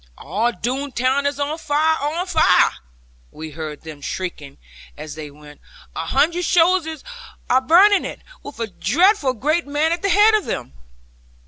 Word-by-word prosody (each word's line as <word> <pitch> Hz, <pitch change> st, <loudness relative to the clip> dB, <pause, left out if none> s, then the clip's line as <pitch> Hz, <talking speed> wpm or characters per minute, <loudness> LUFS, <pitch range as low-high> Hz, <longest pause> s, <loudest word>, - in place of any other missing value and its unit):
'All 210 Hz, +10 st, -1 dB
Doone 260 Hz, +7 st, -4 dB
town 260 Hz, +3 st, 0 dB
is 285 Hz, 0 st, -3 dB
on 295 Hz, +3 st, -2 dB
fire, 310 Hz, +1 st, +1 dB
on 315 Hz, +5 st, -2 dB
fire!' 320 Hz, -, +4 dB, 0.6 s
we 155 Hz, 0 st, -9 dB
heard 155 Hz, -1 st, -7 dB
them 155 Hz, -3 st, -10 dB
shrieking 150 Hz, -3 st, -6 dB, 0.4 s
as 155 Hz, -1 st, -8 dB
they 155 Hz, -1 st, -8 dB
went; 150 Hz, 0 st, -16 dB, 0.3 s
'a -, -, -4 dB
hundred 345 Hz, +3 st, +1 dB
soldiers 330 Hz, -3 st, +2 dB, 0.5 s
are 255 Hz, +1 st, +4 dB
burning 370 Hz, +8 st, +5 dB
it, -, -, -7 dB, 0.2 s
with 285 Hz, -4 st, -11 dB
a 230 Hz, -, -1 dB
dreadful 300 Hz, -, +1 dB
great 305 Hz, +7 st, -1 dB
man 295 Hz, +3 st, 0 dB
at 340 Hz, 0 st, -2 dB
the 395 Hz, -, 0 dB
head 415 Hz, +4 st, +5 dB
of 430 Hz, -2 st, +1 dB
them!' 65 Hz, -, -5 dB
285 Hz, 160 wpm, -20 LUFS, -, 0.6 s, burning